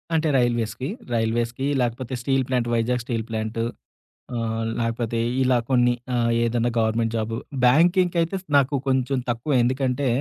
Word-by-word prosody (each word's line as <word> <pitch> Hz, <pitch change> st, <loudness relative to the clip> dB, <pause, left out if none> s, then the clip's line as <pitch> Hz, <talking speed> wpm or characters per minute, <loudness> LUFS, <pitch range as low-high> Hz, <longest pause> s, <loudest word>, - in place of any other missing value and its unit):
అంటే, 160 Hz, 0 st, +2 dB
రైల్వేస్‌కి. 120 Hz, +1 st, 0 dB, 0.2 s
రైల్వేస్‌కి 115 Hz, +3 st, 0 dB, 0.2 s
లేకపోతే 120 Hz, +1 st, -2 dB
steel 135 Hz, +1 st, +1 dB
plant 125 Hz, -2 st, 0 dB
Vizag 120 Hz, +2 st, +1 dB
steel 115 Hz, -2 st, -3 dB
plant. 110 Hz, 0 st, -2 dB, 0.7 s
ఆహ్, 115 Hz, -1 st, -2 dB, 0.2 s
లేకపోతే 115 Hz, 0 st, -1 dB, 0.2 s
ఇలా 125 Hz, -1 st, +3 dB
కొన్ని 125 Hz, -2 st, +4 dB, 0.2 s
ఆహ్, 120 Hz, -1 st, +2 dB
ఏదన్నా 120 Hz, 0 st, +1 dB
గవర్నమెంట్ 115 Hz, 0 st, +1 dB
జాబు 115 Hz, +1 st, -2 dB, 0.3 s
బ్యాంకింక్ 175 Hz, +7 st, +4 dB
అయితే 165 Hz, +4 st, -1 dB, 0.2 s
నాకు 140 Hz, +1 st, +2 dB
కొంచెం 130 Hz, 0 st, +1 dB
తక్కువె 120 Hz, +4 st, 0 dB
ఎందుకంటే, 130 Hz, +2 st, 0 dB
120 Hz, 135 wpm, -23 LUFS, 115-130 Hz, 0.7 s, కొన్ని